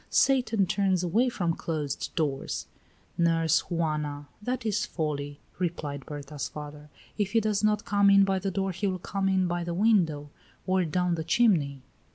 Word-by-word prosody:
Satan 245 -7 +3
turns 190 -1 +1
away 220 +9 +2
from 175 -8 -1
closed 150 -4 -4
doors." 145 -5 -2 0.5
"Nurse 165 -1 +2
Juana, 150 -4 -2
that 250 +2 -3
is 210 -2 +1
folly," 145 -3 -3 0.2
replied 150 -6 -3
Berta's 145 -2 -5
father; 150 0 -9 0.3
"if 200 -1 0
he 230 - +5
does 215 -1 0
not 210 -1 +2
come 200 -1 +4
in 200 0 +7
by 195 -1 +1
the 195 +1 -2
door 195 +1 -1
he 200 +3 -2
will 185 -1 -1
come 195 +2 -2
in 190 -1 +2
by 175 0 -1
the 170 0 -3
window, 170 -9 +2 0.3
or 185 -1 +2
down 180 +2 0
the 160 -1 -2
chimney." 155 - +2
175 Hz, 170 wpm, -28 LUFS, 150-200 Hz, 0.5 s, in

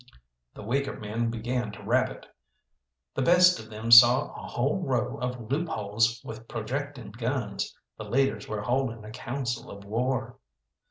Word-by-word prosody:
The - - -9
weaker 140 +6 -1
men 110 +2 -2
began 120 0 -2
to - - -11
rabbit, - - 0 0.9
the - - -2
best 180 +2 +6
of 110 0 -11
them 110 +1 -5
saw 120 +2 +9
a - - -8
whole 140 +9 0
row 130 -7 -1
of 125 -2 -4
loopholes 115 -7 0
with 115 +1 -9
projecting 130 0 -5
guns, 120 +2 -3 0.2
the - - -6
leaders 130 -5 0
were 105 -1 -4
holding 120 -2 -1
a 110 - -9
council 120 0 -4
of 100 0 -10
war. 125 +6 -2
120 Hz, 150 wpm, -27 LUFS, 110-135 Hz, 0.9 s, saw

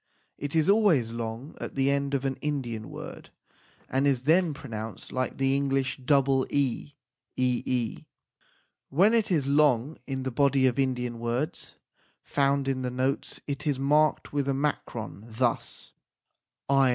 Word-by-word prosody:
It 145 +2 -4
is 160 0 +3
always 195 - +4
long 115 +5 -5
at - - -5
the 135 0 +2
end 140 0 0
of 140 0 -2
an 135 -1 0
Indian 120 -7 -3
word, - - -9 0.6
and 135 +2 +1
is 130 -3 +1
then 165 +3 +4
pronounced 115 -6 -7
like 130 0 -2
the 135 0 +2
English 135 -1 0
double 135 0 +2
e 140 0 -1 0.4
ee. 125 -2 -1 0.8
When 190 +11 +4
it 225 -2 +2
is 155 -6 +2
long 140 -1 +2
in 135 -1 -3
the 130 - -2
body 140 +1 +3
of 125 0 +2
Indian 125 -3 -1
words 120 +6 -3 0.5
found 140 -1 +1
in 135 -1 0
the 125 - -1
notes 130 +3 -1
it 140 +2 -4
is 145 -3 +1
marked 150 +3 +2
with 140 -1 0
a - - +2
makron, 130 -7 -3
thus 120 +1 -2 0.7
l. 135 -1 +4
135 Hz, 150 wpm, -27 LUFS, 125-145 Hz, 0.8 s, always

